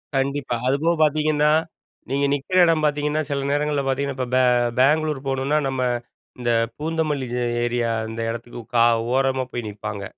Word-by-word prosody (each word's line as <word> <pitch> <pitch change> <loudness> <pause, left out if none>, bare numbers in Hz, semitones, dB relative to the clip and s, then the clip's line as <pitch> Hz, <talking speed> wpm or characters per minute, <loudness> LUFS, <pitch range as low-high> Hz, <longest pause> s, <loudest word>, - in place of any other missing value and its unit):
கண்டிப்பா. 135 -2 -1
அது 130 - +3
போக 170 +1 +3
பார்த்தீங்கன்னா, 150 0 +2 0.6
நீங்க 140 +2 +1
நிக்கிற 145 +6 -1
எடம் 165 -2 +2
பார்த்தீங்கன்னா, 150 +1 0
சில 140 -1 -2
நேரங்கள்ல 145 0 0
பார்த்தீங்கன்னா, 140 +1 -1
இப்ப 130 -1 -2
பெ 130 - +5 0.4
பெங்களூர் 150 +2 +3
போணுனா 135 +2 0
நம்ம 135 -1 -2 0.6
இந்த 120 -1 0 0.3
பூந்தமல்லி 155 -4 -1
ஏ - - 0 0.2
ஏரியா 120 -1 0 0.2
அந்த 115 +1 -5
எடத்துக்கு 120 +1 -6 0.2
க - - +4 0.4
ஓரமா 135 0 +1
போய் 120 -2 -4
நிப்பாங்க 100 -1 -6
140 Hz, 155 wpm, -22 LUFS, 130-150 Hz, 0.6 s, பெ